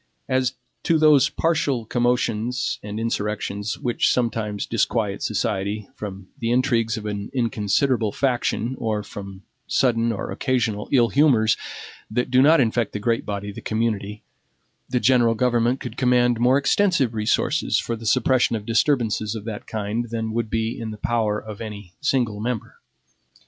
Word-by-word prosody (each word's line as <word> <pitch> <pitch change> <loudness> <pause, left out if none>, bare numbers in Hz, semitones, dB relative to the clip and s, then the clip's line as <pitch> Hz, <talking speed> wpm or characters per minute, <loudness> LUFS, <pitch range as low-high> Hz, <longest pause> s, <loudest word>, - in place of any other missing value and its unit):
As 130 -1 +1 0.3
to 165 - +2
those 150 -3 +5
partial 150 -8 0
commotions 120 0 0
and 105 +1 -5
insurrections, 105 -2 -2
which 120 -1 +1
sometimes 110 -4 -1
disquiet 105 -2 0
society, 105 -2 -2
from 95 -2 -8
the 115 - -1
intrigues 120 -2 +1
of 110 - -6
an 105 -1 -4
inconsiderable 115 0 +1
faction, 125 -1 0
or 110 -3 -1
from 100 -1 -9 0.2
sudden 115 -3 +2
or 105 - -4
occasional 110 -6 -1
illhumors 120 -3 +4 0.5
that 125 +3 -1
do 130 0 +5
not 155 +4 +6
infect 115 -3 +1
the 105 - -3
great 115 +2 -1
body 100 0 -4
of 100 - -9
the - - -7
community 110 -2 -2 0.7
the 125 - +1
general 120 -1 +4
government 120 +1 +1
could - - -7
command 125 -2 +3
more 125 +3 +4
extensive 140 - +2
resources 110 +7 +1
for 115 - -2
the 115 0 -7
suppression 130 0 +3
of 105 -2 -5
disturbances 115 -3 +1
of 110 - -6
that 110 -2 -6
kind 110 +2 -3
than 110 -1 -3
would 115 -1 -1
be 115 +2 -2
in 115 - -4
the 110 - -7
power 110 -2 0
of 105 -1 -8
any 105 -5 -8
single 125 -8 0
member. 115 0 -4
115 Hz, 155 wpm, -23 LUFS, 105-125 Hz, 0.7 s, not